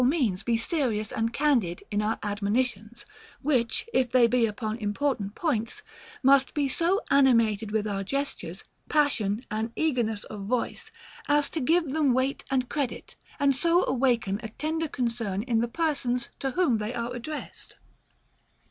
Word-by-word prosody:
143 260 -1 +3
means 185 - -7
be 235 -1 +1
serious 230 -5 -1
and 230 -2 -1
candid 235 - +1
in 205 0 +1
our 215 +1 0
admonitions; 215 +2 -2 0.4
which, 255 - +1
if 255 -2 +2
they 250 -2 +6
be 235 0 +3
upon 215 0 -3
important 210 -1 -1
points, 280 - -2 0.4
must 275 0 +4
be 290 -2 +1
so 340 +8 +1
animated 230 -6 +4
with 215 0 0
our 195 -1 -2
gestures, 275 +7 -4 0.3
passion, 235 -9 +2
and 220 +2 -2
eagerness 240 -9 0
of 210 -2 -8
voice, 245 +1 -2 0.4
as 290 -1 +2
to 325 - -2
give 320 +1 +2
them 285 -4 +2
weight 260 +2 0
and 260 -2 +1
credit 280 -3 -3 0.2
and 280 -1 +3
so 340 +5 +3
awaken 240 -6 +1
a 220 - -6
tender 315 +7 -2
con 255 -4 -1
cern 215 -4 -3
in 235 -2 +1
the 235 - +1
persons 255 -4 -1
to 270 - -1
whom 265 -6 +2
they 215 +3 -3
are 235 +1 -3
addressed. 290 +5 -7
245 Hz, 160 wpm, -27 LUFS, 220-280 Hz, 0.4 s, they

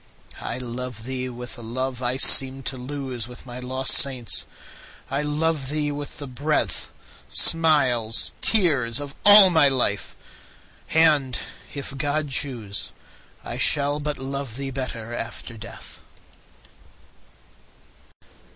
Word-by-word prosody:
I - - -4
love 125 -1 -6
thee 130 +1 -4
with 125 +1 -8
a - - -8
love 130 +2 -4
I 125 +1 0
seemed 135 0 +5
to 135 - -2
lose 130 -2 -6
With 125 +1 -12
my 125 0 -7
lost 130 +1 +1
saints,—I 135 +2 -1
love 150 -1 -1
thee 150 0 -1
with 145 0 -6
the 145 - -6
breath, 145 +4 -2 0.4
Smiles, 135 -9 +3
tears, 145 - +3
of 145 -1 -6
all 205 -2 +9
my 160 -4 +6
life!—and, 135 +4 -1 0.4
if 140 -1 -6
God 145 +1 -1
choose, 120 -7 -2 0.5
I - - -6
shall 145 0 +1
but 150 0 -3
love 135 -3 -5
thee 135 -1 -5
better 120 -3 -6
after 120 0 -6
death. 115 +1 -11
135 Hz, 115 wpm, -23 LUFS, 125-145 Hz, 0.5 s, all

